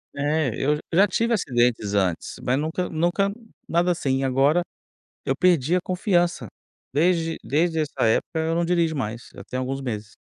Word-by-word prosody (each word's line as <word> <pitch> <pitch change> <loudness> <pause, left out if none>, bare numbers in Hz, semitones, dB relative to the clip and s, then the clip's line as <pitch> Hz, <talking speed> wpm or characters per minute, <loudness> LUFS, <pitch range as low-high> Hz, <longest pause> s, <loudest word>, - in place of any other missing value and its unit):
É, 145 -1 0
eu 145 +5 +1
j 150 - -7
já 195 +5 +5
tive 230 +5 0
acidentes 120 - +1
antes, 95 -4 0
mas 125 - +2
nunca 160 +5 -2
nunca 175 +5 0 0.4
nada 170 +2 +1
assim, 135 -6 0
agora, 135 +6 +3 0.6
eu 135 - +1
perdi 170 -1 +3
a - - +1
confiança. 180 -1 0 0.4
Desde 165 +2 +1
desde 160 +2 0
essa 150 -2 -2
época 115 +8 +1
eu 160 +1 0
não 170 0 +1
dirijo 170 -2 +1
mais, 115 -2 -5
já - - -10
tem 130 - -5
alguns 135 +1 -3
meses. 105 -4 -5
155 Hz, 170 wpm, -24 LUFS, 130-175 Hz, 0.6 s, já